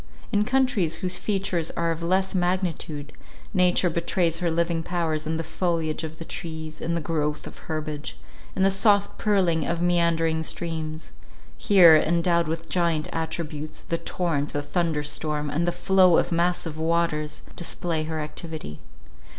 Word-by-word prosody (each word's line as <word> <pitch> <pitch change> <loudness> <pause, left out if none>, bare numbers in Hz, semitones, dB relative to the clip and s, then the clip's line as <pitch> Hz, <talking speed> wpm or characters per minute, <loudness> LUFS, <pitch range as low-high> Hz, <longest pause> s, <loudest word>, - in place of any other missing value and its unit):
In 205 0 +2
countries 250 - +2
whose 180 0 -1
features 190 -5 -1
are 170 0 +1
of 165 0 -4
less 190 +3 +1
magnitude, 175 -5 -1 0.4
nature 180 -1 +3
betrays 170 0 0
her 175 -2 0
living 170 0 0
powers 165 -3 -2
in 160 0 -1
the 165 - -2
foliage 165 -1 -1
of 160 0 -6
the 165 - -8
trees, 160 -3 -6
in 170 +1 -1
the 170 - -1
growth 150 -2 -2
of - - -10
herbage, 155 - -4 0.4
in - - +1
the 195 - +5
soft 200 +1 +2
purling 185 -7 +2
of 170 +2 -1
meandering 170 -2 +2
streams; 160 -1 -4 0.4
here, 180 -6 +7
endowed 170 +1 +2
with 165 +1 -4
giant 170 -4 0
attributes, 155 -2 -4
the 165 - -3
torrent, 160 -5 -2
the 145 - -1
thunder 160 -1 -1
storm, 150 0 -2
and 170 +4 0
the - - +3
flow 185 -2 +4
of 175 - +1
massive 170 -2 0
waters, 160 -2 0
display 165 -2 -2
her 160 0 -3
activity. 150 - -6
165 Hz, 155 wpm, -25 LUFS, 155-175 Hz, 0.4 s, here